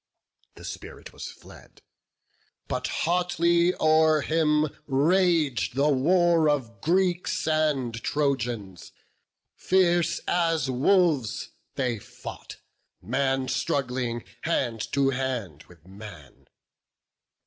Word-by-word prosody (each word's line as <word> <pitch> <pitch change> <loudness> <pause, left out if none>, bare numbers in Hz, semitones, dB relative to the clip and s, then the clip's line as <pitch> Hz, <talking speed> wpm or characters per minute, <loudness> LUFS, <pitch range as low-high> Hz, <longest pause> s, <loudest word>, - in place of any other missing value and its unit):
The - - -12
spirit - - -9
was - - -7
fled; - - -15 0.8
but - - -2
hotly 170 0 +1
o'er 155 -1 +4
him 155 -1 +1 0.2
rag'd 155 - +2
The 140 +2 +2
war 165 +3 +3
of 115 -6 -2
Greeks 180 0 0
and 150 -6 +1
Trojans; 120 - -2 0.6
fierce 175 -2 +2
as 165 -6 +1
wolves 145 - +1 0.3
They 125 -5 -1
fought, - - -10 0.4
man 135 -1 -1
struggling 125 -4 -2 0.2
hand 120 -9 -2
to 135 -1 +2
hand 125 - -4
with 85 -2 -19
man. 95 - -13
145 Hz, 95 wpm, -26 LUFS, 125-170 Hz, 0.8 s, o'er